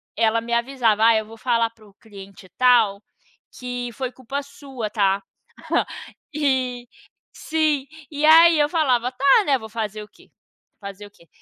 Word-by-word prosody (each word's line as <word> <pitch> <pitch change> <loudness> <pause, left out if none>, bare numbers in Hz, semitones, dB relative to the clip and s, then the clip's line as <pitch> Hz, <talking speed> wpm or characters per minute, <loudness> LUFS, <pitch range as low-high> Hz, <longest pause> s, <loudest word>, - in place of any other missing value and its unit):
ela 225 0 +2
me 235 +1 -5
avisava: 235 -3 +1
"Ai, 225 -1 +5
eu - - -12
vou 225 +1 -13
falar 230 -1 0
para 225 -1 -22
o 200 - -21
cliente 200 -3 -14
tal, 230 -5 +3 0.6
que 245 -1 -5
foi 260 +1 -4
culpa 260 +3 -6
sua, 270 -5 -8
tá?". 200 -2 +1 1.1
E 255 -4 -1 0.5
sim, 310 -4 -1 0.3
e 295 0 -1
aí 330 +1 +7
eu 295 - +2
falava: 255 -7 +1
"Tá", 275 - +3
né, 275 -2 +2
vou 220 - -10
fazer 215 -1 -5
o - - -14
quê? - - -23 0.5
Fazer 200 0 -9
o - - -21
quê? 170 - -24
240 Hz, 165 wpm, -22 LUFS, 220-275 Hz, 1.1 s, aí